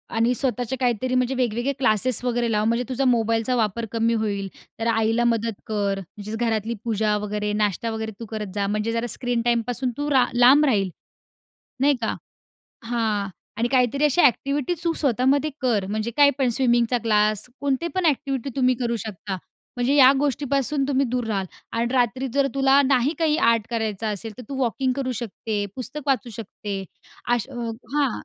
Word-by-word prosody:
आणि 230 +2 +3
स्वतःचे 245 0 -1
काहीतरी 250 0 0
म्हणजे 255 +1 +1
वेगवेगळे 245 +2 0
क्लासेस 250 0 +2
वगैरे 240 -1 0
लाव, 210 0 +1
म्हणजे 235 +2 +1
तुझा 260 +1 0
मोबाईलचा 230 0 +2
वापर 225 0 0
कमी 230 0 +1
होईल. 205 -3 -1 0.3
तर 230 - -1
आईला 225 +1 +2
मदत 230 -2 0
कर, 200 -2 -1
म्हणजेच 205 +4 -8
घरातली 225 -1 -1
पूजा 215 -2 +1
वगैरे, 210 0 -2
नाश्ता 210 +1 0
वगैरे 220 0 -4
तू 230 - -6
करत 215 -2 -4
जा. 200 -1 0
म्हणजे 210 +2 -1
जरा 230 +1 -1
स्क्रीन 245 +1 -1
टाईमपासून 240 +2 0
तू 290 +1 -2
रा 260 -2 +5
लांब 255 +5 +6
राहील, 200 -8 +2 0.9
नाही 285 +2 +4
का? 220 - 0 0.7
हां. 220 -4 -1 0.3
आणि 230 +2 0
काहीतरी 260 +2 +2
अशा 300 +4 +4
ॲक्टिव्हिटी 280 +6 +2
तू 335 - +2
स्वतःमध्ये 275 +3 +2
कर, 220 -7 +1
म्हणजे 215 +3 -2
काही 285 -1 +7
पण 265 -3 +2
स्विमिंगचा 240 -2 +2
क्लास 215 -1 +2
कोणते 285 +3 0
पण 370 -2 +1
ॲक्टिव्हिटी 275 -3 0
तुम्ही 255 -1 +3
करू 235 -1 0
शकता, 200 -3 -5 0.4
म्हणजे 245 +3 +1
या 270 -2 +8
गोष्टीपासून 280 0 0
तुम्ही 275 -1 +2
दूर 245 0 -1
राहाल. 195 -4 -1 0.3
आणि 230 +1 0
रात्री 255 +1 +1
जर 280 -1 +3
तुला 270 0 +5
नाही 270 +1 +2
काही 315 -2 +2
आर्ट 230 -5 +3
करायचा 220 -2 -2
असेल, 215 +1 -4
तर - - -7
तू 275 - -5
वॉकिंग 255 +2 0
करू 255 -2 -1
शकते, 215 -2 -3
पुस्तक 260 +3 -5
वाचू 255 -4 0
शकते 205 -2 -6 0.5
अश 240 +1 -2 0.5
हां. 285 -4 +2
235 Hz, 170 wpm, -23 LUFS, 220-265 Hz, 0.9 s, या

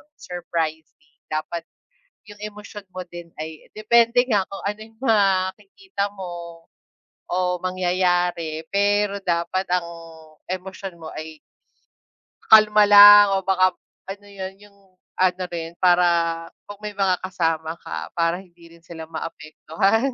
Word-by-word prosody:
surprising, 160 - -5 0.2
dapat 160 +2 -4 0.7
'yung 205 - -14 0.2
emosyon 210 -1 -10
mo 185 - -4
din 175 -1 -10
ay 155 0 -8
depende 235 +3 +4
nga 200 -3 +2
kung 195 - -9
ano 210 +1 -3
'yung 220 0 -14
makikita 200 - 0
mo 170 -3 -8 0.6
o 180 0 0
mangyayari, 180 -3 0
pero 205 0 +1
dapat 170 +2 -1
ang 180 -2 0 0.6
emosyon 185 0 -6
mo 160 - -7
ay 155 0 -8 1.1
kalma 215 -1 +7
lang 205 0 +10
o 195 - +1
baka 185 -1 +2 0.3
ano 200 +1 -8
yun, 190 -1 -7
'yung 205 -1 -19 0.4
ano 185 0 +1
rin, 165 -1 -6
para 180 -1 +5 0.6
'pag 205 -1 -9
may 210 0 -5
mga 195 -2 +1
kasama 165 -4 -1
ka - - -7
para 170 0 0
hindi 175 -3 -17
rin 165 - -26
sila 160 -2 -9
maapektuhan. 165 - -1
185 Hz, 125 wpm, -22 LUFS, 170-205 Hz, 1.1 s, lang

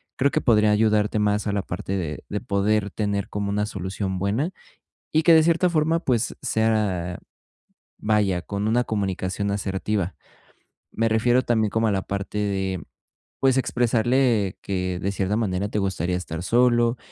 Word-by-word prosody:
creo 140 +2 +2
que - - 0
podría 105 -3 +4
ayudarte 105 0 +2
más 105 0 +1
a - - +1
la 100 - 0
parte 95 +2 -4
de 80 -5 -4
de 105 - -3
poder 100 +1 +1
tener 100 -1 -2
como 100 -1 -3
una 105 +1 0
solución 95 -1 -4
buena, 105 - 0 0.6
y 155 +1 +2
que, 170 - +6
de 160 - +7
cierta 170 +2 +3
forma, 160 0 +1
pues 120 -7 0
sea, 105 -6 0 0.8
vaya, 105 -4 +1
con 100 +3 -3
una 120 +3 +2
comunicación 100 -1 -2
asertiva. 100 -1 -2 0.8
Me 115 0 0
refiero 120 +3 +3
también 110 -3 +1
como 115 0 +1
a - - +2
la 95 -1 0
parte 100 +2 -4
de, 95 -3 -1 0.6
pues, 135 -1 +3
expresarle 120 -4 +1
que, 90 -2 -2
de 100 - -1
cierta 100 +1 -1
manera, 100 -2 -1
te 105 - -1
gustaría 90 -2 -1
estar 85 -2 -5
solo 120 +2 +3
105 Hz, 160 wpm, -24 LUFS, 95-115 Hz, 0.8 s, de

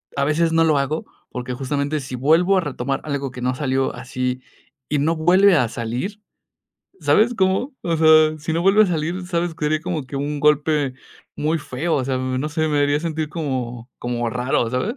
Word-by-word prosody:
a 140 - +1
veces 165 +3 +1
no 165 0 +4
lo 155 -2 +3
hago, 140 +3 -1 0.2
porque, 125 0 -5
justamente, 140 +3 -2
si 130 -2 -6
vuelvo 165 +9 +3
a - - +3
retomar 135 -3 -3
algo 140 -3 -3
que 125 - -9
no 125 +1 0
salió 135 -1 -1
así, 125 +1 -3 0.5
y 150 - +1
no 160 +4 +1
vuelve 180 +4 +5
a 125 -5 +1
salir. 125 - -4 0.8
¿Sabes 230 +3 +3
cómo? 190 +7 +1
O 170 -1 0
sea, 155 -1 +5
si 155 +2 -4
no 165 - 0
vuelve 195 +3 +5
a - - +3
salir, 175 +1 -2
sabes, 175 -2 -1
que 160 - -5
sería 155 +1 +1
como 165 -5 -4
que 140 - -6
un 145 +1 -3
golpe 150 -2 +2 0.4
muy 155 +2 0
feo. 155 +3 -2
O 135 - 0
sea, 130 0 -1
no 130 +3 -2
sé, 155 +1 -1
me 145 -1 +1
haría 145 +1 +2
sentir 160 -2 -3
como 130 -7 -4
como 120 -1 -2
raro, 125 -1 0
¿sabes? 185 - -2
150 Hz, 200 wpm, -21 LUFS, 130-165 Hz, 0.8 s, vuelve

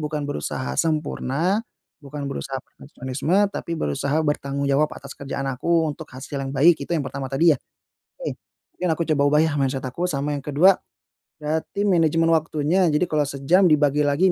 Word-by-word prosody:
bukan 150 -1 -3
berusaha 75 - -3
sempurna, 155 - 0 0.4
bukan 145 0 -7
berusaha 135 -1 -4
perfeksionisme, 155 +8 -1
tapi 170 - -4
berusaha 140 - -1
bertanggung 140 -1 -1
jawab 145 +2 +3
atas 140 0 -9
kerjaan 140 0 -4
aku 165 +6 +1
untuk 150 +1 -9
hasil 130 +2 -7
yang 135 0 -4
baik, 165 +3 +6
itu - - -6
yang 155 - 0
pertama 135 +1 -5
tadi 155 +5 +4
ya? 140 - -2 0.6
Oke. - - -4 0.4
Mungkin 180 - -2
aku 170 - 0
coba 145 - +1
ubah 150 +1 +4
yah 160 - 0
mindset 135 -1 -1
aku, 170 +8 -2
sama 145 -1 -1
yang 145 - -3
kedua, 155 +7 +4 0.6
berarti 155 +6 -2
manajemen 165 -3 +3
waktunya. 160 +3 +2
Jadi 150 +3 +2
kalau 150 -4 0
sejam 155 +8 +3
dibagi 150 -1 +3
lagi, 175 +6 +3
150 Hz, 170 wpm, -23 LUFS, 140-165 Hz, 0.6 s, baik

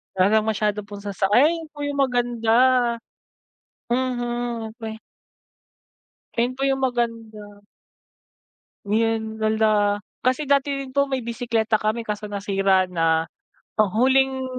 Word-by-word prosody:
Wala 200 +4 +4
ng 215 - -4
masyado 210 -1 0
pong 205 -1 -9
sasak 200 -1 -1
ay, 295 +6 +6
'yan 330 -2 -5
po 290 - -6
yung 285 -1 -3
maganda. 240 -4 +1 1.4
Mhm, 240 -2 -2
okey. 220 -2 -7 1.4
Ayun 245 +2 0
po - - -1
yung 270 0 0
maganda. 225 -4 -3 1.2
Ngayon, 220 +1 -1
hala. 220 0 +2 0.6
Kasi 255 +4 +1
dati 280 0 +2
din 265 - -10
po 280 0 +2
may 260 -3 -2
bisekleta 230 -2 0
kami 220 +2 -1
kaso 210 0 -4
nasira 195 -2 +1
na. 165 -2 +1 0.5
Oh, 215 -1 +4
huling 265 +5 +2
225 Hz, 125 wpm, -23 LUFS, 210-255 Hz, 1.4 s, ay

